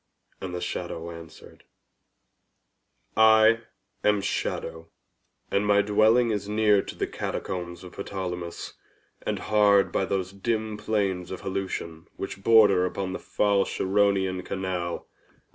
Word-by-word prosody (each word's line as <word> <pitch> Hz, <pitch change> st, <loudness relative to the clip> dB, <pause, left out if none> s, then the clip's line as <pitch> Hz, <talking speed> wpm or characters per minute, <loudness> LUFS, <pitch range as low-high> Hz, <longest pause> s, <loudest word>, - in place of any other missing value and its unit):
And 90 Hz, -2 st, -5 dB
the 90 Hz, -, -4 dB
shadow 85 Hz, -1 st, -4 dB
answered, 85 Hz, -2 st, -13 dB, 1.5 s
"I 110 Hz, +1 st, +6 dB, 0.4 s
am 105 Hz, -1 st, +3 dB
SHADOW, 80 Hz, -4 st, -3 dB, 0.6 s
and 100 Hz, -, +2 dB
my 100 Hz, 0 st, +4 dB
dwelling 110 Hz, +3 st, +4 dB
is 105 Hz, -1 st, -3 dB
near 105 Hz, -1 st, +4 dB
to -, -, -8 dB
the -, -, -1 dB
Catacombs 85 Hz, -1 st, -5 dB
of 90 Hz, -, -12 dB
Ptolemais, 90 Hz, -3 st, -5 dB, 0.5 s
and -, -, -2 dB
hard 105 Hz, -2 st, +3 dB
by 95 Hz, -, 0 dB
those 95 Hz, -1 st, -2 dB
dim 110 Hz, +1 st, -2 dB
plains 100 Hz, -4 st, -1 dB
of 95 Hz, -, -6 dB
Helusion 95 Hz, -3 st, -4 dB
which 95 Hz, 0 st, -6 dB
border 105 Hz, -4 st, +6 dB
upon 95 Hz, 0 st, -4 dB
the -, -, -4 dB
foul 100 Hz, -1 st, +1 dB
Charonian 95 Hz, -2 st, +1 dB
canal." 90 Hz, -3 st, -3 dB
95 Hz, 125 wpm, -26 LUFS, 90-105 Hz, 1.5 s, I